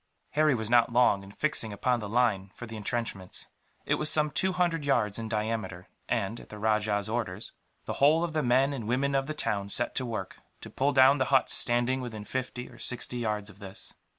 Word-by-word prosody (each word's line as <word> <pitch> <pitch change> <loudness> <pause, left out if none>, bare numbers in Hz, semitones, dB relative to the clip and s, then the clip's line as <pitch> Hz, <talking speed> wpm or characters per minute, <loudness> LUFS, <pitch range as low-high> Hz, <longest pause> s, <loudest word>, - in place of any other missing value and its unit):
Harry 150 -2 +3
was 110 -2 -3
not 120 0 +4
long 120 -4 +4
in 100 0 -12
fixing 115 -3 0
upon 120 +4 0
the 105 -2 -6
line 110 -5 +1
for 120 - -7
the 115 -1 -8
entrenchments. 105 -3 -3 0.4
It - - +1
was 150 - +2
some 150 -1 +2
two 190 +6 +2
hundred 175 -4 0
yards 115 -7 +1
in 110 -1 -5
diameter 110 -5 -3 0.2
and, 105 +4 -1
at - - -14
the 105 - -9
rajah's 105 -1 +1
orders, 110 -3 -3 0.3
the - - -3
whole 155 +4 +5
of 170 -2 -2
the 155 - +1
men 130 +3 +3
and 120 -6 -5
women 135 +4 +1
of 135 0 +1
the 155 - -4
town 100 -8 -2
set 120 +4 +2
to 130 - -1
work, 110 -5 -5 0.2
to - - -10
pull 140 +2 +1
down 135 +1 +6
the 130 - +2
huts 135 -1 +2
standing 120 +2 +1
within 110 -4 -6
fifty 125 +1 -4
or - - -15
sixty 125 0 -1
yards 105 -3 -2
of 105 -1 -11
this. 95 -2 -4
120 Hz, 215 wpm, -29 LUFS, 105-135 Hz, 0.4 s, down